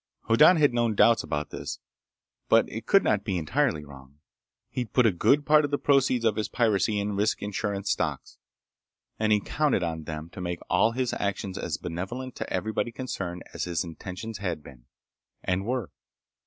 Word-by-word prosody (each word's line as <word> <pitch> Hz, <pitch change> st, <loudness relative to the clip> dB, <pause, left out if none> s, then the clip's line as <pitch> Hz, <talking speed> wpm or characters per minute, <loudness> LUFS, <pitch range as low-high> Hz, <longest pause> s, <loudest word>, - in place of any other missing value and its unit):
Hoddan 115 Hz, +10 st, +6 dB
had 145 Hz, -5 st, +4 dB
known 120 Hz, -2 st, +1 dB
doubts 115 Hz, +2 st, +5 dB
about 75 Hz, 0 st, -3 dB
this, -, -, -5 dB, 0.7 s
but -, -, +5 dB
it 115 Hz, -, -7 dB
could 195 Hz, -, +5 dB
not 100 Hz, -2 st, +1 dB
be 100 Hz, -4 st, -1 dB
entirely 85 Hz, -, 0 dB
wrong. 70 Hz, 0 st, -14 dB, 0.5 s
He'd 125 Hz, -3 st, -4 dB
put 125 Hz, -, +4 dB
a 110 Hz, -, +5 dB
good 140 Hz, -, +3 dB
part 155 Hz, 0 st, +5 dB
of 145 Hz, -, -1 dB
the 145 Hz, -, 0 dB
proceeds 130 Hz, -5 st, +2 dB
of 110 Hz, -2 st, +2 dB
his 110 Hz, -, -1 dB
piracy 105 Hz, -2 st, +1 dB
in 100 Hz, 0 st, -2 dB
risk 105 Hz, +1 st, 0 dB
insurance 100 Hz, -1 st, -2 dB
stocks, -, -, -3 dB, 0.8 s
and 110 Hz, 0 st, +1 dB
he 105 Hz, -, +5 dB
counted 145 Hz, -3 st, 0 dB
on 80 Hz, -2 st, -3 dB
them 80 Hz, +2 st, -6 dB
to -, -, -8 dB
make 90 Hz, -1 st, -3 dB
all 100 Hz, +5 st, +3 dB
his 125 Hz, 0 st, -1 dB
actions 100 Hz, -1 st, -3 dB
as -, -, -3 dB
benevolent 120 Hz, +10 st, -5 dB
to -, -, -5 dB
everybody 110 Hz, +2 st, -1 dB
concerned 95 Hz, -8 st, -5 dB
as -, -, -3 dB
his 85 Hz, -4 st, -1 dB
intentions 95 Hz, +6 st, -7 dB
had 85 Hz, -6 st, -3 dB
been, -, -, -14 dB, 0.6 s
and 95 Hz, +3 st, -1 dB
were. 125 Hz, -5 st, -2 dB
105 Hz, 180 wpm, -27 LUFS, 90-120 Hz, 0.8 s, Hoddan